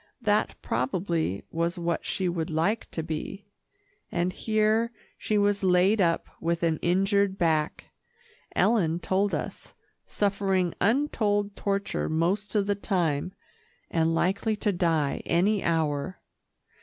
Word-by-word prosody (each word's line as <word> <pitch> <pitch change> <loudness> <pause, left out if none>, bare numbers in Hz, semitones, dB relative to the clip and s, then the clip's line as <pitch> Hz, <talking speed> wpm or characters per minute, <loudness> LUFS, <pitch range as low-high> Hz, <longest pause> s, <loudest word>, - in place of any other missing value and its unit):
That 210 -1 +2
probably 160 - -1
was 170 +2 -1
what 170 -1 -2
she 190 - -1
would 170 -2 -2
like 170 +8 0
to 160 - -4
be, 165 +6 -5 0.7
and 180 +1 0
here 220 +2 +1 0.2
she 215 - -1
was 205 0 +2
laid 190 +3 +4
up 165 -2 +1
with 170 +1 -1
an 160 -2 +1
injured 195 +2 +2
back, 160 -4 0 0.7
Ellen 175 -8 +2
told 190 +4 +1
us, - - -6 0.3
suffering 195 -3 0
untold 205 -4 +1
torture 200 0 -1
most 180 +7 0
of 205 -2 +3
the 205 - +1
time, 180 -5 -1 0.6
and 165 0 +2
likely 200 +6 +1
to 210 0 0
die 165 -6 0
any 195 +5 +2
hour. 160 0 0
185 Hz, 125 wpm, -27 LUFS, 165-205 Hz, 0.7 s, laid